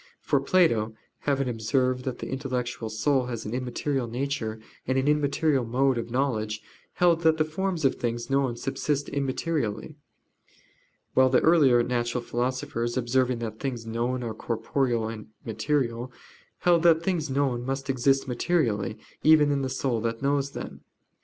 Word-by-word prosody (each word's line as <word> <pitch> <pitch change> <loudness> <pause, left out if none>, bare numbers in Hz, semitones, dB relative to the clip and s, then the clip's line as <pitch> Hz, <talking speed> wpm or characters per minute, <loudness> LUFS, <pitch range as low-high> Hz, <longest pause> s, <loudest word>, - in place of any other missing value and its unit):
For - - +1
Plato, 115 - +2 0.3
having 135 -1 +1
observed 125 +2 0
that 130 -2 -3
the - - -6
intellectual 125 -4 -3
soul 125 +4 +1
has 120 -3 -5
an 105 - -4
immaterial 125 +1 -2
nature, 120 -3 -3 0.3
and 130 +1 +1
an 135 +1 +1
immaterial 150 -1 +2
mode 125 +2 +1
of 115 - -5
knowledge, 110 -4 -1 0.3
held 170 -2 +3
that 160 -1 +4
the 155 - +2
forms 175 0 -2
of 135 - +4
things 120 0 -2
known 135 -3 +1
subsist 140 +2 -2
immaterially. 140 -2 -2 1.2
While 130 0 +5
the 130 - +4
earlier 140 -8 +5
natural 120 0 -1
philosophers, 120 -1 -2
observing 125 0 +1
that 110 0 -7
things 125 -4 -4
known 120 +3 -2
are 115 -2 -3
corporeal 115 +1 -1
and 110 -1 -7 0.2
material, 120 0 -1 0.5
held 175 -2 +4
that 165 -1 +5
things 170 -5 -1
known 135 -3 0
must 135 +1 -3
exist 135 +1 +2
materially 120 - 0 0.2
even 150 -2 +6
in 140 -1 +1
the 135 - -1
soul 130 -3 -1
that 115 +2 -3
knows 140 0 +1
them. - - -7
130 Hz, 155 wpm, -27 LUFS, 120-140 Hz, 1.2 s, even